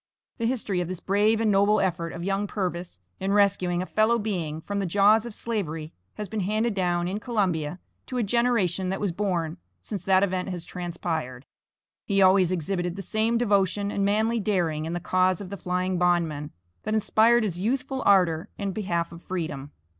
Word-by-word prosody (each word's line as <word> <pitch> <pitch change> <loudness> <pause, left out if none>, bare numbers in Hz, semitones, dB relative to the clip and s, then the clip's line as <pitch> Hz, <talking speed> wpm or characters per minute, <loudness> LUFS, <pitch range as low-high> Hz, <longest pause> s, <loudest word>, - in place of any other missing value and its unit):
The 230 - +1
history 215 -7 -1
of 175 - -3
this 185 -1 -5
brave 205 +4 +2
and 220 -2 +2
noble 200 +2 +4
effort 170 -3 -1
of 170 - -6
young 195 +2 -1
Purvis, 180 - -4 0.2
in 195 +1 0
rescuing 185 -3 +2
a - - -5
fellow 220 +4 +2
being 175 -8 -3
from 200 +4 -3
the 195 - -1
jaws 205 +5 +4
of 235 - -8
Slavery 165 -9 -4 0.2
has 210 - -5
been 220 +3 -4
handed 215 +4 0
down, 175 -2 0
in 195 +3 -2
Columbia, 180 -9 -1 0.3
to 255 - -4
a 240 - +1
generation 205 -5 +1
that 190 - -2
was 200 -3 0
born 175 -4 -2 0.3
since 200 -4 -5
that 190 0 +4
event 185 -1 -1
has 175 -2 -5
transpired. 165 -8 -4 0.6
He 200 -2 +2
always 185 -2 +5
exhibited 175 0 -2
the 195 - -6
same 220 +4 +1
devotion 200 -3 +1
and 200 - -1
manly 220 +3 +2
daring 175 -7 0
in 165 - -3
the 175 - -2
cause 185 0 +2
of 195 -2 -8
the - - -3
flying 180 0 -1
bondman 165 -5 +1 0.3
that 215 - -2
inspired 225 +2 +4
his 180 -5 -2
youthful 260 +5 -1
ardor 175 -5 +3
in 200 -1 -2
behalf 175 -5 -2
of 170 0 -11
freedom. 155 -7 -4
190 Hz, 190 wpm, -26 LUFS, 175-210 Hz, 0.6 s, always